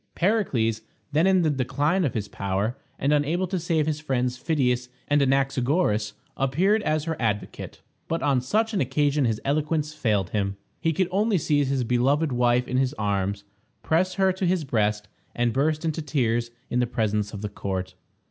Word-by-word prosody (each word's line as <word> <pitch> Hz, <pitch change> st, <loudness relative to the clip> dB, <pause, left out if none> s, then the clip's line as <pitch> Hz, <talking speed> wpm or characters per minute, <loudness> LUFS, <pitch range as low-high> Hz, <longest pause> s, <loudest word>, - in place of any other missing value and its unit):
Pericles, 135 Hz, -, +1 dB, 0.3 s
then 155 Hz, +5 st, +3 dB
in 190 Hz, -2 st, +4 dB
the 155 Hz, -, +2 dB
decline 145 Hz, +7 st, +1 dB
of 135 Hz, -, -2 dB
his 105 Hz, -2 st, -2 dB
power, 100 Hz, +5 st, -2 dB, 0.2 s
and 140 Hz, +2 st, +1 dB
unable 155 Hz, +5 st, +1 dB
to 185 Hz, 0 st, -2 dB
save 160 Hz, -2 st, +1 dB
his 155 Hz, -1 st, -1 dB
friends 125 Hz, -4 st, -1 dB
Phidias 125 Hz, -3 st, 0 dB, 0.2 s
and 145 Hz, 0 st, +3 dB
Anaxagoras, 135 Hz, -, +1 dB, 0.2 s
appeared 180 Hz, +11 st, +2 dB
as 155 Hz, -5 st, 0 dB
her 165 Hz, 0 st, -2 dB
advocate. 105 Hz, -3 st, -3 dB, 0.2 s
But 165 Hz, -, -2 dB
on 135 Hz, -3 st, +2 dB
such 220 Hz, -, 0 dB
an 195 Hz, -, +1 dB
occasion 145 Hz, +2 st, +1 dB
his 110 Hz, -2 st, 0 dB
eloquence 150 Hz, +1 st, 0 dB
failed 105 Hz, -11 st, 0 dB
him. 100 Hz, -2 st, -1 dB, 0.2 s
He 165 Hz, -, +1 dB
could 180 Hz, +3 st, +1 dB
only 205 Hz, +2 st, +2 dB
seize 145 Hz, -3 st, +1 dB
his 135 Hz, -2 st, +1 dB
beloved 135 Hz, +6 st, +2 dB
wife 125 Hz, 0 st, +2 dB
in 125 Hz, -, -1 dB
his 130 Hz, +2 st, +1 dB
arms, 100 Hz, -3 st, -1 dB, 0.4 s
press 180 Hz, +4 st, +1 dB
her 190 Hz, -1 st, +3 dB
to 185 Hz, 0 st, -1 dB
his 180 Hz, -2 st, +1 dB
breast, 105 Hz, -5 st, 0 dB, 0.3 s
and 120 Hz, -1 st, +1 dB
burst 155 Hz, +4 st, 0 dB
into 160 Hz, 0 st, -1 dB
tears 120 Hz, -5 st, 0 dB, 0.2 s
in 125 Hz, -, +2 dB
presence 105 Hz, -3 st, -1 dB
of 105 Hz, -1 st, -7 dB
the 105 Hz, -, -2 dB
court. 95 Hz, -2 st, -4 dB
135 Hz, 175 wpm, -25 LUFS, 115-160 Hz, 0.4 s, in